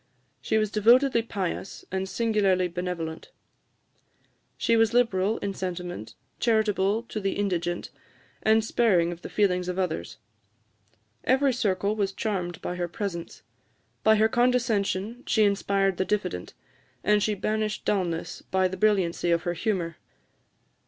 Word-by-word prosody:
She - - +1
was 215 -1 +1
devotedly 235 +4 +4
pious, 195 -4 -4
and 190 0 -2
singularly 200 -6 +2
benevolent: 175 - -5 1.3
she 230 - +2
was 225 0 +3
liberal 220 -3 +2
in 200 -1 -2
sentiment, 175 - -5 0.2
charitable 215 -2 +2
to 220 - -5
the 195 -1 -1
indigent, 175 -4 -2 0.5
and 220 0 +3
sparing 190 -8 +2
of 175 0 -8
the - - -7
feelings 180 -3 +1
of 180 0 -3
others. 175 - -2 1.1
Every 265 +1 +3
circle 200 -2 0
was 200 -2 -1
charmed 185 -5 -3
by 180 - -3
her 175 -1 -1
presence; 175 -2 -5 0.6
by 220 0 +6
her 215 +1 +4
condescension 235 -2 +1
she 220 - +3
inspired 195 -2 +1
the - - +1
diffident; 190 - -2 0.5
and 210 0 +3
she 210 +1 +1
banished 215 +2 -2
dulness 175 -5 -1
by 190 0 +1
the 190 +1 -6
brilliancy 190 -5 +2
of 170 0 +2
her 175 - -1
humour. 175 -5 -2
200 Hz, 135 wpm, -26 LUFS, 180-220 Hz, 1.3 s, by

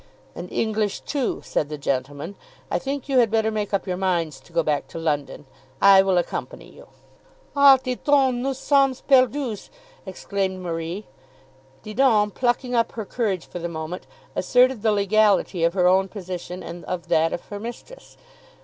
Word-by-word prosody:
"And - - -8
English 215 -2 -1
too," 280 -4 -2
said 145 - -1
the 150 - -5
gentleman. 140 +4 -3 0.4
"I - - +1
think 275 -1 -4
you 270 -2 +3
had 235 -2 +4
better 220 0 +1
make 210 -2 -3
up 200 - 0
your 180 -2 -3
minds 170 -6 -1
to 135 - -21
go 165 - +1
back 150 -2 -1
to - - -9
London. 150 -3 -2 0.3
I 195 -1 +7
will 190 -1 +1
accompany 175 - -3
you." - - -16 0.7
"Ah, 280 -1 +8
Didon, 260 0 +1
nous 270 0 -2
sommes 275 -2 +2
perdues!" 260 -4 +2 0.4
exclaimed 190 0 -3
Marie. 170 +3 -4 0.8
Didon, 215 -2 +2
plucking 245 +2 -1
up 230 -1 +1
her 220 -2 -5
courage 195 -6 -2
for 175 - -8
the 170 0 -4
moment, 160 +2 -6 0.3
asserted 250 +3 +3
the 220 0 +2
legality 205 -3 +2
of 170 +2 +2
her 180 -2 +2
own 190 +1 +4
position 180 -2 -7
and 170 0 -8
of 180 -2 -5
that 160 +1 +3
of - - -5
her 205 - -6
mistress. 240 - -10
200 Hz, 165 wpm, -23 LUFS, 175-245 Hz, 0.8 s, Ah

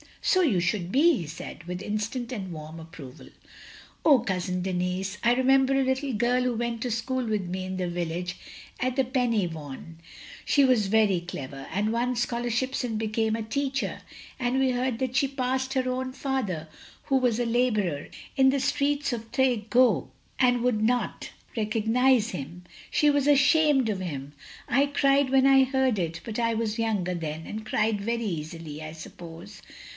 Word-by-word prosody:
" - - -29
"So 370 - +4
you 250 - +3
should 175 +1 -1
be," 320 +6 +5
he 170 - -5
said, 160 +1 -8
with 180 +1 -5
instant 225 +4 -3
and 195 -7 -5
warm 155 0 -8
approval. 160 -6 -11 0.8
"Oh, 285 -5 +7
Cousin 180 -4 -2
Denis, 185 +2 -2
I 235 +1 +5
remember 265 +1 +3
a - - +3
little 265 +1 -1
girl 240 +3 +2
who 250 -1 0
went 235 0 -2
to 245 - -2
school 250 +3 -1
with 210 -4 -1
me 185 +1 -4
in 185 0 -4
the 180 -1 -1
village 175 +1 -3 0.4
at 255 0 -1 0.2
Pen 250 -2 +2
y 210 -5 +1
watm; 155 +1 -8 0.5
she 285 - +4
was 250 -6 +3
very 200 -4 +3
clever, 135 -6 -7
and 210 +3 0
won 245 +2 0
scholarships 240 +2 -1
and 230 -3 -2
became 220 0 0
a 225 - -3
teacher, 270 +4 -2 0.4
and 250 +1 +1
we 265 -1 +3
heard 250 -1 -1
that 260 -1 -2
she 275 +2 +3
passed 260 0 -2
her 260 -1 0
own 255 0 -3
father, 240 - -2 0.4
who 270 - +2
was 245 -3 +1
a 240 - +1
labourer, 215 - 0 0.3
in 265 0 +5
the 275 +1 +1
streets 285 0 0
of 225 -1 -6
Tref 245 -5 +1
goch 250 0 +3 0.3
and 245 -2 +3
wotild 240 -3 +1
not 245 +3 0 0.3
recognise 225 +2 +2
him. 170 +2 -7 0.3
She 300 - +3
was 285 -1 +2
ashamed 290 -2 +4
of 200 -3 -1
him! 145 -6 -5 0.3
I 275 +2 +3
cried 280 -1 +3
when 265 0 +4
I 270 -1 +7
heard 260 -4 +1
it, 165 -2 -3
but 225 0 -5
I 230 -1 +1
was 220 0 -2
younger 205 -6 0
then 160 -2 -5
and 215 +1 -6
cried 215 -1 0
very 230 +2 -1
easily, 160 -3 -5
I 155 0 -7
suppose. 170 +4 -11
230 Hz, 180 wpm, -27 LUFS, 185-260 Hz, 0.8 s, Oh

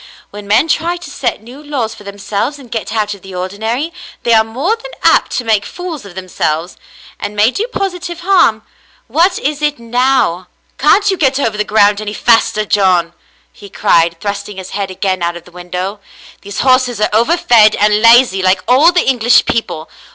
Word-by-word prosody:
When 205 0 -10
men 215 +10 +3
try 335 +3 0
to 350 - -10
set - - -3
new 250 +5 -12
laws 265 -7 -3
for - - -14
themselves 200 +6 -4
and 255 -4 -15
get 225 -2 -4
out 210 -2 -1
of 200 - -13
the 190 0 -10
ordinary, 220 - -3 0.3
they 235 - +2
are 220 -1 +5
more 265 - -2
than 485 +2 -11
apt - - +4
to 250 - -2
make 220 -3 +1
fools 335 - -7
of 185 -3 -12
themselves, 175 -2 -3 0.4
and 210 - -5
may 210 +4 +3
do 435 - -3
positive 360 -6 -4
harm. 345 - +2 0.4
What 340 +9 +1
is 295 +1 -3
it 295 -1 0
now? 235 -6 0
" - - -42
"Can't 400 +8 +3
you 380 - -2
get 270 -3 +1
over 225 -6 -1
the 210 - 0
ground 210 -1 +2
any 210 0 -5
faster, 225 -2 +2
John?" 185 -4 +1 0.4
he 200 - -13
cried, 170 -2 +1
thrusting 200 0 -5
his 190 -1 -8
head 200 -1 -3
again 185 -1 -2
out 170 0 -2
of 170 - -13
the 180 - -17
window. 180 +3 -5 0.4
"These 200 0 -5
horses 255 -3 +2
are 215 - +1
overfed 230 -3 +4
and 210 +1 +2
lazy, 230 -4 +5
like 185 0 +1
all 280 +8 +5
the 355 - 0
English 245 -2 +3
people. 165 -8 -3
220 Hz, 195 wpm, -14 LUFS, 200-270 Hz, 0.4 s, are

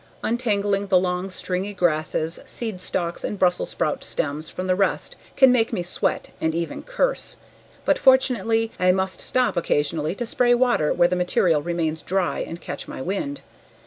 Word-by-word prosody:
Untangling 205 -4 0
the 190 - +4
long 180 +1 -1
stringy 190 +2 -3
grasses, 160 -1 0
seed 220 -6 -4
stalks, 170 -2 -3
and 205 - -3
Brussels 180 -2 +1
sprout 155 -3 -2
stems 150 +2 -2
from 185 - -5
the 185 - +2
rest 195 +1 0 0.2
can 265 -2 +7
make 235 -2 +2
me 195 -7 -1
sweat 175 - -2
and 160 0 0
even 170 0 -3
curse, - - -1 0.5
but - - +3
fortunately 230 -4 +3
I 180 0 +4
must 190 0 -2
stop 255 -1 +1
occasionally 155 0 0
to 240 - -3
spray 245 +1 +3
water 240 -11 +2
where 175 - +4
the 180 - -1
material 180 -3 +2
remains 160 -1 -2
dry 190 -1 -1
and 165 - -5
catch - - -6
my - - -7
wind. 270 - -3
185 Hz, 170 wpm, -23 LUFS, 170-225 Hz, 0.5 s, can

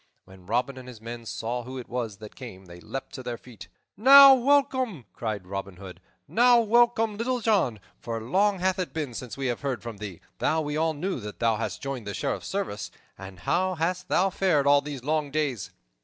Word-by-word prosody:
When 95 -1 -16
Robin 125 +4 -1
and 125 - -11
his 125 -3 -10
men 115 +1 -8
saw 120 +3 -3
who 130 +2 -8
it 125 - -7
was 115 -5 -4
that 105 0 -11
came, 95 -7 -10
they 85 0 -12
leaped 135 +10 -7
to - - -6
their 120 -2 -5
feet. 120 -3 -13 0.3
"Now 275 +4 +10
welcome!" 260 - +2
cried 105 -5 -4
Robin 95 0 -5
Hood. 95 -1 -10 0.3
"Now 240 +1 +5
welcome, 230 -1 +3
Little 250 +3 -1
John! 195 - +1 0.2
For 115 -1 -4
long 195 - +1
hath 190 +1 0
it 180 - -3
been 150 -6 -3
since 125 +1 -7
we 135 - -3
have 120 -2 -1
heard 135 -4 -3
from 115 -3 -7
thee, 100 -4 -7 0.2
though 160 - +1
we 150 -1 -3
all 160 0 +1
knew 185 +2 -3
that 105 -2 -8
thou 115 -2 +1
hadst 115 - -4
joined 135 -6 -4
the 100 - -4
Sheriff's - - -3
service. 190 - -3 0.3
And 95 -1 -11
how 185 - +1
hast 180 +3 -2
thou 190 +1 +2
fared 170 -7 +2
all 140 0 +5
these 140 -3 -7
long 150 0 0
days?" 135 -10 -2
135 Hz, 210 wpm, -26 LUFS, 115-185 Hz, 0.3 s, Now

